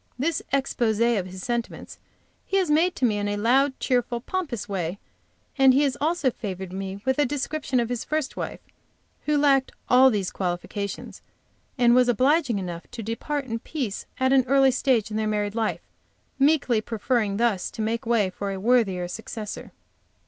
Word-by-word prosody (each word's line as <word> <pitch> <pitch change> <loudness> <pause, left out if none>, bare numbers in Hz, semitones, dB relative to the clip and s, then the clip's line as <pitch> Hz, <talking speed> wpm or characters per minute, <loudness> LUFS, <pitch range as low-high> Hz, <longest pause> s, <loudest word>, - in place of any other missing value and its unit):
This 300 +4 0
expose 245 -5 0
of 230 -5 +2
his 185 0 -9
sentiments 235 -1 -4 0.5
he 390 - +1
has 365 -5 +1
made 335 +4 +3
to 260 - +1
me 210 -3 +1
in 205 - -1
a 205 0 -1
loud, 265 +5 +2
cheerful, 245 -2 0
pompous 275 - -4
way, 185 -2 -3 0.6
and 265 -1 +6
he 285 - +4
has 275 -2 +1
also 315 -3 +1
favored 190 -4 -6
me 195 +1 -5
with 265 +1 +1
a - - +5
description 280 -1 -1
of 235 -1 -1
his 245 -2 -2
first 305 -3 -2
wife, - - -5 0.7
who 300 0 +3
lacked 275 -2 +3 0.2
all 260 +1 +7
these 205 -6 -1
qualifications, 190 +2 -4 0.6
and 240 -1 +5
was 250 0 +4
obliging 260 0 +2
enough 175 -3 -6
to 230 - -7
depart 275 +6 -3
in 230 -2 -3
peace 245 -7 -4
at 260 +1 +3
an 265 -1 +5
early 270 0 +5
stage 245 -4 +1
of 215 - -2
their 220 0 0
married 210 -1 -1
life, 225 -1 -1 0.6
meekly 275 -5 +3
preferring 220 -2 -1
thus 225 -5 +1
to 220 - -5
make 230 +1 -1
way 225 -5 +1
for 200 +2 -4
a 195 - -4
worthier 200 -5 +2
successor. 215 +2 -7
235 Hz, 180 wpm, -25 LUFS, 205-270 Hz, 0.7 s, all